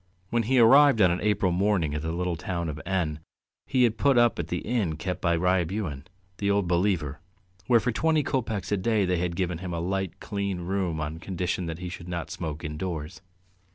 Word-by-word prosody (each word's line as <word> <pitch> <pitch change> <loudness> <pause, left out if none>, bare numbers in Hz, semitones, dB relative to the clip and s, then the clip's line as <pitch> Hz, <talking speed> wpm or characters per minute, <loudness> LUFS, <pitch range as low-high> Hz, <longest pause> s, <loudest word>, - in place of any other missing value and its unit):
When 120 - +2
he 130 - +3
arrived 135 +2 +7
on 90 -4 +5
an 90 - -1
April 105 -3 +2
morning 90 -4 +1
at 75 - -2
the 80 +1 -3
little 90 +1 -1
town 85 +1 -3
of 75 +1 -5
N 85 -6 -1 0.5
he 130 -2 +3
had 115 -2 +2
put 140 -3 +4
up 120 -1 +4
at - - -2
the - - -2
inn 105 -9 -1
kept 90 +3 -4
by 85 -2 +2
Ryabuhin, 90 -4 0 0.3
the 100 - 0
Old 100 -2 +2
Believer, 85 -5 0 0.5
where 120 -2 +5
for 125 +2 0
twenty 155 +6 +2
kopecks 110 -9 -2
a 105 - +2
day 105 +1 +1
they 90 -1 +1
had 85 0 -2
given 90 -2 -1
him 90 -1 -4
a - - -2
light, 95 +1 -2
clean 100 -3 -3
room 90 -3 -1
on 75 +1 -4
condition 90 -1 -3
that 80 -1 -4
he 90 +1 -6
should 85 0 -8
not 85 -2 -4
smoke 80 -2 -5
indoors. 75 0 -5
90 Hz, 210 wpm, -27 LUFS, 85-105 Hz, 0.5 s, arrived